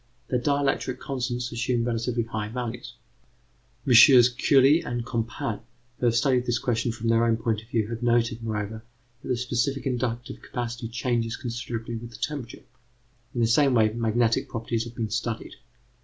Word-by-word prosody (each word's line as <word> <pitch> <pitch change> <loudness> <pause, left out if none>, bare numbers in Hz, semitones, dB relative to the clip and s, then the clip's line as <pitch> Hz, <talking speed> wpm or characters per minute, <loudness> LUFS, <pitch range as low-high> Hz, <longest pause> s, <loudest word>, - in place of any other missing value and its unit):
Their 125 - +1
dielectric 140 -1 0
constants 125 -3 -3
assume 120 0 0
relatively 115 0 -1
high 110 -2 -4
values. 120 +1 -5 0.9
MM. 125 -1 +7
Curie 140 +5 +5
and 120 -1 -3
Compan, 115 -2 -3 0.4
who 125 - +2
have 115 - +2
studied 125 +1 +2
this 120 0 +2
question 120 0 0
from 115 0 -5
their 115 0 +4
own 115 -1 +2
point 110 -1 -1
of 110 - -19
view, 115 -3 0
have 115 0 -5
noted, 120 -1 +1
moreover, 110 0 -4 0.4
that - - -10
the 125 - 0
specific 125 +3 -1
inductive 120 -2 -3
capacity 120 -1 -4
changes 115 -1 -1
considerably 115 -1 -5
with 115 +1 -8
the 120 - -12
temperature. 140 -6 -5 0.7
In 120 - 0
the - - +4
same 130 +3 +4
way, 110 -2 +3
magnetic 115 0 +1
properties 115 0 -2
have 120 0 -10
been 110 -4 -3
studied. 115 0 -3
120 Hz, 165 wpm, -26 LUFS, 115-125 Hz, 0.9 s, MM